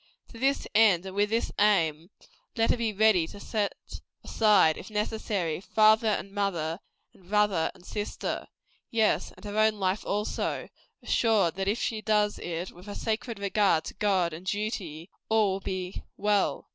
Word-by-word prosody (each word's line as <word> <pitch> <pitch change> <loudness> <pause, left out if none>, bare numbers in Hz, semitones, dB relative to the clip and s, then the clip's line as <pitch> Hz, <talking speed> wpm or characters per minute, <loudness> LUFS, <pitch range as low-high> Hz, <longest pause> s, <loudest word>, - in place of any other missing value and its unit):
To 230 - -12
this 275 +2 +1
end 205 -5 +5
and 190 0 -7
with 205 +1 +2
this 230 +2 0
aim, 170 -6 +2 0.5
let 225 0 +2
her - - +1
be 230 -2 0
ready 205 -5 +3
to 205 - -11
set 205 -1 -2 0.5
aside, 205 -8 +4
if - - -9
necessary, 210 -6 -2
father 220 +2 +4
and 200 -2 -1
mother, 180 -5 -2 0.3
and 180 -1 -21
brother 205 -5 +2
and 180 -1 -18
sister 210 -1 -4 0.4
yes, 220 -3 +1
and - - -14
her 205 +1 -2
own 215 0 +4
life 190 0 -1
also, 210 +1 -2 0.3
assured 215 -8 +2
that 195 0 -2
if 210 +3 +1
she 220 -3 -2
does 210 -1 +1
it 175 +1 -4
with 180 +3 -15
a 205 - -6
sacred 225 0 -3
regard 200 -4 +2
to - - -7
God 190 -5 +1
and 175 +4 -9
duty, 195 -5 -3 0.2
all 220 -3 +3
will 190 - -3
be 185 -1 -5 0.2
well. 205 -1 +1
205 Hz, 170 wpm, -28 LUFS, 185-215 Hz, 0.5 s, end